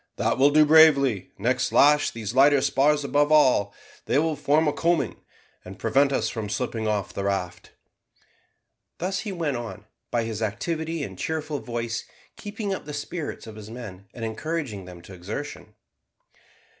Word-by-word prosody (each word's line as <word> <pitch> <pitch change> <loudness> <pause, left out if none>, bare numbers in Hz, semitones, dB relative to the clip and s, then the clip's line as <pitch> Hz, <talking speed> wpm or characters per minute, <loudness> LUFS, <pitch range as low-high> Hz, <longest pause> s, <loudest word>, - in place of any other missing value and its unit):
That - - 0
will 140 +2 +6
do 155 +1 +5
bravely; 140 - +5
next 125 +5 0
lash 150 +1 +5
these 110 -1 -6
lighter 140 +1 +5
spars 150 +3 +2
above 145 +1 +1
all, 130 -9 +4 0.3
they 125 - +1
will 160 +1 +1
form 150 +2 +2
a 150 - +1
coaming, 170 -1 0 0.5
and 95 +2 -10
prevent 135 +6 +2
us 135 - 0
from 110 -3 -4
slipping 110 +1 -2
off 105 -3 -1
the 100 - -4
raft." 90 -2 -3 1.2
Thus 190 +2 -2
he 205 - -4
went 160 -8 -2
on, 115 -3 -7 0.2
by 120 -1 0
his 115 -1 -4
activity 160 - -2
and - - -8
cheerful 155 -2 -3
voice, 115 -1 -4 0.3
keeping 205 -1 -4
up 190 - -6
the 150 -1 -6
spirits 145 +2 -5
of 110 -2 -10
his 110 -1 -10
men, 105 -5 -9
and 115 - -4
encouraging 115 - -4
them 90 -1 -12
to 95 - -12
exertion. 100 +11 -7
130 Hz, 165 wpm, -25 LUFS, 110-150 Hz, 1.2 s, will